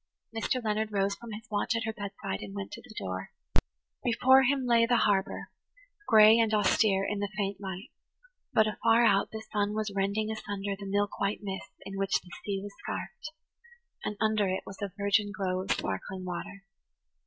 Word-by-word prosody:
Mr. 225 +3 0
Leonard 215 0 0
rose 200 -1 +1
from 235 +2 -9
his 215 +1 -8
watch 205 +2 +1
at 230 - 0
her 220 0 -2
bedside 200 - -5
and 100 -1 -7
went 100 0 -5
to - - -8
the - - -14
door. 95 -1 -4 0.7
Before 260 +2 +6
him 265 0 +2
spread 230 -1 +4
the 240 - +5
harbour, 195 -3 +1 0.6
gray 220 0 +8
and 225 -1 +3
austere 200 -1 +3
in 205 - -2
the 205 0 -1
faint 200 -1 -2
light, 190 0 -6 0.6
but 220 - +5
afar 225 +2 +3
out 200 -3 +4
the 220 0 -7
sun 205 0 +1
was 215 -1 -2
rending 200 +2 0
asunder 205 -2 -3
the 200 0 -8
milk 205 +1 0
white 200 +1 0
mists 195 -1 -6
in 195 0 -5
which 195 0 +2
the 180 - -16
sea 200 -2 -2
was 205 0 -7
scarfed, 215 +11 -5 0.7
and 210 - -3
under 215 -2 +2
it 185 0 -1
was 195 +2 -10
a 200 -2 -2
virgin 200 +1 +2
glow 185 -2 -1
of 190 - -3
sparkling 185 - -2
water. 185 +2 -5
205 Hz, 190 wpm, -30 LUFS, 195-220 Hz, 0.7 s, gray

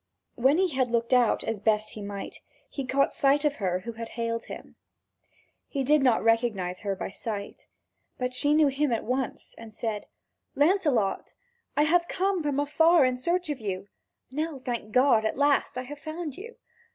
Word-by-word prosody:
When 265 +5 +3
he 375 0 +2
had 260 -4 0
looked 235 +1 0
out 245 -2 +3
as 225 -2 -3
best 215 0 +1
he 215 - -8
might, 200 -1 -7 0.3
he 275 -3 -6
caught 275 +1 +2
sight 285 -1 +3
of 290 -1 +1
her 185 -2 -1
who 235 - -6
had 230 0 -7
hailed 230 0 -2
him. - - -10 0.9
He 275 -2 -2
did 295 +2 +4
not 250 -4 +3
recognise 220 -6 +1
her 200 -2 -2
by 190 - -5
sight. 205 -1 -6 0.5
But 250 0 -2
she 290 +4 +2
knew 305 -2 +5
him 275 0 0
at 230 - 0
once 255 +1 -3
and 225 -1 -10
said: 215 -1 -4 0.5
"Lancelot, 290 - +1 0.4
I 295 - +5
have 340 +3 +3
come 380 0 0
from 290 -2 -1
afar 320 +1 +4
in 255 0 +1
search 340 +5 -1
of 285 - -4
you. 200 -2 -5 0.4
Now, 305 +2 -3
thank 240 -4 -5
God, 250 -2 +4
at 220 - -1
last 285 -2 +2
I 255 - -2
have 290 +3 -9
found 310 -2 -5
you. 455 +5 -10
255 Hz, 185 wpm, -27 LUFS, 225-295 Hz, 0.9 s, knew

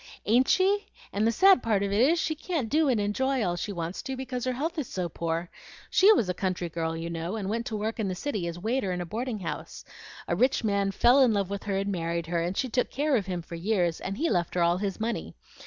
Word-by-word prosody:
"Ain't 245 +5 +4
she? 395 +2 +2 0.3
and 210 +2 +2
the - - +3
sad 380 - +6
part 210 -3 +1
of 200 - -1
it 205 +3 +2
is, 310 +7 +4
she 320 -1 0
can't 310 -6 -3
do 310 -1 +3
and 240 -4 +2
enjoy 255 +5 0
all 175 -1 0
she 190 +4 -4
wants 170 -1 -4
to, 265 - -4
because 255 -1 -4
her 255 - +1
health 320 +6 -2
is 275 - -3
so 180 -2 -3
poor. 165 +1 -3 0.4
She 390 +3 +7
was 230 - +1
a 180 - 0
country 180 -2 -2
girl, 165 0 -2
you 165 +1 -4
know, 170 +4 -4
and 200 -2 -3
went 230 +2 -2
to 220 - -3
work 220 +2 -3
in 215 - 0
the 185 - -2
city 200 -5 -3
as 170 0 -5
waiter 220 +1 -1
in 180 - -2
a 175 - -3
boarding 220 +3 -4
house. 170 - -6 0.4
A 170 - 0
rich 250 +6 +2
man 200 -2 +1
fell 245 +7 +5
in 245 -4 +5
love 200 -2 -1
with 200 0 -3
her 200 -2 -1
and 200 +1 -1
married 170 -2 -2
her, 170 0 -1
and 175 +3 -2
she 260 - +1
took 250 +1 0
care 290 +1 +1
of 205 -5 0
him 180 -2 -3
for 170 - -11
years, 175 -1 0
and 195 +2 -4
he 330 - +1
left 175 - 0
her 175 - +3
all 170 +1 +3
his 195 -1 -3
money. 230 +1 -3
205 Hz, 270 wpm, -27 LUFS, 175-255 Hz, 0.4 s, She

